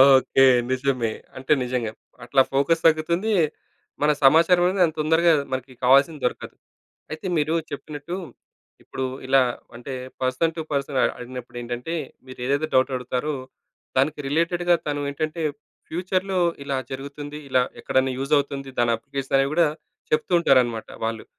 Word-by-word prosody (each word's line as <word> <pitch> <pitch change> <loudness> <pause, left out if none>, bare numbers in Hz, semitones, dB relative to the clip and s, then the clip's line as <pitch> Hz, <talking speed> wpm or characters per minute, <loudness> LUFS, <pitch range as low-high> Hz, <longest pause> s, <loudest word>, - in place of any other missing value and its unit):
Okay. 135 +1 +4 0.3
నిజమే. 130 -4 0 0.2
అంటే 130 +2 -5
నిజంగా! 125 -3 -2 0.3
అట్లా 135 - +4
ఫోకస్ 160 +5 +2
తగ్గుతుంది. 170 +7 +1 0.7
మన 150 +1 +4
సమాచారమనేది 175 +6 +5
అంత 160 -1 -4
తొందరగా 160 +2 +4 0.2
మనకి 130 0 -4
కావాల్సింది 140 +4 +4
దొరకదు. 125 - -3 0.6
అయితే 155 +4 -6
మీరు 155 +2 +1 0.2
చెప్పినట్టు, 150 +4 -6 0.7
ఇప్పుడు 130 - -5 0.2
ఇలా, 135 0 +5 0.3
అంటే 125 +3 -8 0.3
పర్సన్ 130 +6 +1
టు - - -3
పర్సన్ 140 -1 -1
అ - - +5
అడిగినప్పుడేంటంటే, 125 +3 -6 0.3
మీరేదైతే 130 +4 -1
డౌటడుగుతారో, 130 +2 0 0.6
దానికి 145 +3 +1
రిలేటెడ్‌గా 170 +3 +2
తను 145 -1 -1
ఏంటంటే, 155 +3 -3 0.5
ఫ్యూచర్‌లో 185 +2 -1 0.3
ఇలా 140 -1 -1 0.2
జరుగుతుంది. 145 +2 -7
ఇలా 130 -1 +3 0.2
ఎక్కడెన్నా 130 0 +1
యూజవుతుంది 140 -1 0
దాని 120 -1 +3
అప్లికేషన్ 135 +2 -2
అనేవి 135 +2 +1
కూడా, 170 -2 +4 0.4
చెప్తూ 155 +4 +1
ఉంటారనమాట 120 -7 +2 0.2
వాళ్ళు. 115 0 -3
140 Hz, 125 wpm, -24 LUFS, 130-160 Hz, 0.7 s, సమాచారమనేది